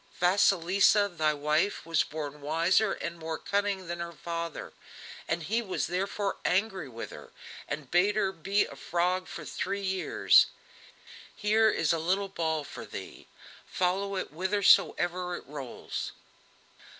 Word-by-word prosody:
Vasilisa, 195 +2 +4
thy 155 -5 +1
wife, 150 +7 0
was 165 -1 +2
born 150 -1 -6
wiser 170 +7 +2
and 170 0 -5
more 160 0 -4
cunning 200 0 -1
than 175 0 -5
her 170 0 -4
father; 170 0 -5 0.7
he 220 +9 0
was 195 -5 -2
therefore 195 +3 -2
angry 190 -5 0
with 115 -1 -7
her, - - -11 0.4
and 140 -4 -5
bade 195 +4 +3
her 195 -3 +1
be 195 +3 +1
a - - -10
frog 175 +5 -1
for - - -8
three 200 +1 -3
years. 190 -1 +4 0.9
Here 220 +1 +3
is 165 -5 +1
a 165 - 0
little 190 +4 0
ball 160 -4 -1
for - - -9
thee, - - -9 0.4
follow 195 +2 0
it 190 - -3
whithersoever 180 0 +2
it - - -9
rolls." 140 -3 -6
180 Hz, 140 wpm, -29 LUFS, 160-195 Hz, 0.9 s, Vasilisa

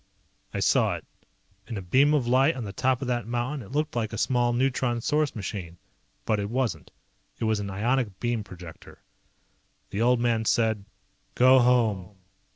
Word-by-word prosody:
I - - -3
saw - - +3
it. - - -9 0.6
In 115 - -5
a - - -4
beam 140 +11 +4
of 135 -5 +1
light 130 +6 +3
on 125 - -5
the 100 -2 -6
top 130 +5 0
of - - -4
that 120 -2 -1
mountain 120 +4 -2
it 100 - -13
looked 150 +1 -1
like 110 -2 -1
a 110 - -5
small 120 +1 +1
neutron 125 -1 0
source 150 +4 0
machine. 95 -5 -6 0.5
But 110 -2 +1
it 100 0 -3
wasn't. 115 - -2 0.5
It - - -5
was 110 -1 +1
an 100 -1 -4
ionic 110 +1 -1
beam 120 -2 -1
projector. 90 -4 -12 0.9
The 100 - -2
old 125 +1 +3
man 115 -2 +1
said, 110 -3 +1 0.5
"Go 130 +1 +6
home." 110 -6 +2
120 Hz, 175 wpm, -26 LUFS, 105-130 Hz, 0.9 s, Go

